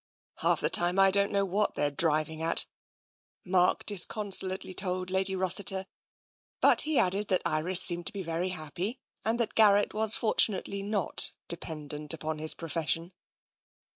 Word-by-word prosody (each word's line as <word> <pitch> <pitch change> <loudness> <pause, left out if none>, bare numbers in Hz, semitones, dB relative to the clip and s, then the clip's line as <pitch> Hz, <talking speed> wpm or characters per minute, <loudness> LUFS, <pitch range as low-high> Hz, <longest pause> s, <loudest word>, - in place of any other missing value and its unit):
" - - -71
Half - - +1
the - - 0
time 175 +2 +3
I 195 0 +5
don't 200 +1 +2
know 200 -1 +1
what 200 +3 -1
they're 145 0 +1
driving 155 +1 0
at," 165 +1 +3 0.8
Mark 180 -1 +1
disconsolately 195 -1 +1
told 185 -1 -3
Lady 190 0 0
Rossiter, 190 +1 0 0.7
but - - +6
he 310 -2 0
added 195 +1 0
that 185 - 0
Iris 170 +4 +3
seemed 175 -2 +1
to - - -1
be 200 -2 -6
very 165 +2 -2
happy 180 - -4 0.2
and 225 +2 -1
that 235 - -1
Gar 210 -3 +5
rett 205 - 0
was 220 0 +1
fortunately 200 -3 +1
not 200 -1 0
dependent 150 -2 -4
upon 155 -1 -5
his 155 0 +2
profession. 165 +2 -3
185 Hz, 160 wpm, -28 LUFS, 165-200 Hz, 0.8 s, but